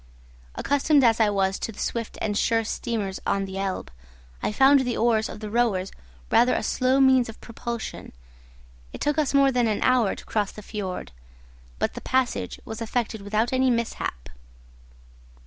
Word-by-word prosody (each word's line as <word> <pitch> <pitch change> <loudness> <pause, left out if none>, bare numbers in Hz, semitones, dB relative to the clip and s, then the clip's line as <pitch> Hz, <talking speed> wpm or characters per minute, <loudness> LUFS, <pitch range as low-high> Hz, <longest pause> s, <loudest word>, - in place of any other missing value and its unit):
Accustomed 285 0 +2
as 230 -2 +4
I 220 -2 +4
was 195 -1 0
to - - -3
the 200 - -16
swift 230 -2 -3
and 205 -1 -1
sure 225 +2 +2
steamers 215 -3 -3
on 195 0 0
the 190 0 -6
Elbe, 195 -1 -3 0.5
I - - -1
found 270 +6 +6
the 250 -3 -1
oars 225 -1 +2
of 210 - -9
the 215 - -5
rowers 210 -5 +1 0.4
rather 245 +1 +4
a - - -1
slow 255 +1 +2
means 260 -3 +5
of 225 - -10
propulsion. 235 0 -6 0.8
It - - -7
took 295 +1 0
us 290 -2 +1
more 275 -1 +5
than 245 -2 +2
an 215 -2 0
hour 250 -6 +3
to - - -12
cross 210 -3 -1
the 210 - -11
fiord; 190 - -5 0.7
but - - -1
the - - -7
passage 260 -1 -1
was 220 +1 -7
effected 225 -1 -2
without 215 +4 0
any 260 0 +3
mishap. 230 - -2
230 Hz, 175 wpm, -25 LUFS, 205-255 Hz, 0.8 s, found